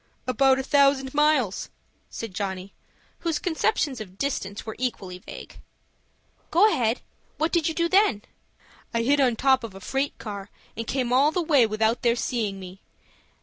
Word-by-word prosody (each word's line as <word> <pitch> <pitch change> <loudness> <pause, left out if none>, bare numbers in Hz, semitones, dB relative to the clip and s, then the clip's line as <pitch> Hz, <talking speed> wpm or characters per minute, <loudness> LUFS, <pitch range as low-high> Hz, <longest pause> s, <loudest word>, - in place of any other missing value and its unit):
"About 265 +1 +3
a 265 - -2
thousand 275 -1 +3
miles," 295 -9 +2 0.4
said 225 -4 -6
Johnny, 190 0 -4 0.5
whose 330 -3 -1
conceptions 320 - 0
of 190 -3 -10
distance 205 -7 -3
were 220 - -6
equally 195 -8 -3
vague. - - -11 0.9
"Go 370 +6 +5
ahead. 230 0 0 0.4
What 315 +2 0
did 335 -3 +2
you 320 - -2
do 335 0 +2
then?" 355 - +3 0.7
"I 230 - +2
hid 285 +4 +3
on 250 -3 +3
top 265 +1 +3
of 220 -4 -7
a - - -8
freight 270 +8 -2
car, 200 -2 -7 0.3
and 230 0 -5
came 250 -2 -1
all 280 +4 +5
the 360 - -1
way 285 -8 +4
without 220 +2 +1
their 235 -1 +3
seeing 220 -5 -2
me. 185 +1 -10
255 Hz, 165 wpm, -25 LUFS, 210-285 Hz, 0.9 s, Go